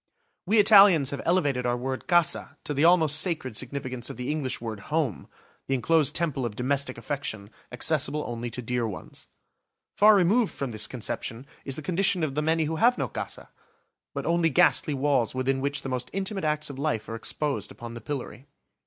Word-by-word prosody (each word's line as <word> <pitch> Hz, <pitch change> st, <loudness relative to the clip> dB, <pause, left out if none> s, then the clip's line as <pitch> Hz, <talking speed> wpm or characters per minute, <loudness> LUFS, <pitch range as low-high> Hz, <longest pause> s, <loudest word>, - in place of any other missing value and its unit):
We 215 Hz, +4 st, +3 dB
Italians 195 Hz, -, +7 dB
have 140 Hz, -, -4 dB
elevated 145 Hz, -8 st, +1 dB
our 120 Hz, 0 st, 0 dB
word 130 Hz, +1 st, -4 dB
"casa" 175 Hz, -3 st, +1 dB
to 150 Hz, -, -3 dB
the 145 Hz, +2 st, +1 dB
almost 160 Hz, -3 st, +4 dB
sacred 155 Hz, -, -2 dB
significance 130 Hz, -1 st, -4 dB
of -, -, -8 dB
the 125 Hz, +3 st, -3 dB
English 150 Hz, -4 st, -2 dB
word 110 Hz, -3 st, -6 dB
"home," 150 Hz, -, -1 dB, 0.4 s
the 135 Hz, -, +1 dB
enclosed 150 Hz, +3 st, +2 dB
temple 155 Hz, -6 st, 0 dB
of 115 Hz, -3 st, -3 dB
domestic 130 Hz, +2 st, -1 dB
affection, 115 Hz, -4 st, -5 dB, 0.2 s
accessible 150 Hz, +3 st, +1 dB
only 120 Hz, 0 st, -4 dB
to 125 Hz, +1 st, -5 dB
dear 120 Hz, 0 st, -1 dB
ones. 100 Hz, -, -9 dB, 0.7 s
Far 210 Hz, +1 st, +6 dB
removed 200 Hz, +4 st, +2 dB
from 135 Hz, -3 st, -4 dB
this 110 Hz, -1 st, 0 dB
conception 120 Hz, 0 st, -5 dB, 0.2 s
is 135 Hz, -, -2 dB
the 155 Hz, -, -7 dB
condition 185 Hz, +1 st, +1 dB
of 150 Hz, -3 st, -1 dB
the 150 Hz, -, -1 dB
many 160 Hz, +1 st, +1 dB
who 160 Hz, +1 st, -2 dB
have 245 Hz, +7 st, +4 dB
no -, -, -1 dB
"casa," -, -, -7 dB, 0.7 s
but -, -, -4 dB
only 170 Hz, -1 st, +2 dB
ghastly 160 Hz, -2 st, +3 dB
walls 135 Hz, -4 st, +1 dB
within 135 Hz, +1 st, 0 dB
which 140 Hz, 0 st, -2 dB
the -, -, -5 dB
most 125 Hz, -1 st, -3 dB
intimate 195 Hz, -2 st, -2 dB
acts 150 Hz, -1 st, 0 dB
of 135 Hz, -, -9 dB
life 140 Hz, -7 st, -2 dB
are -, -, -6 dB
exposed 140 Hz, +5 st, -2 dB
upon 120 Hz, 0 st, -9 dB
the 115 Hz, -, -8 dB
pillory. 135 Hz, +1 st, -6 dB
140 Hz, 190 wpm, -26 LUFS, 125-165 Hz, 0.7 s, Italians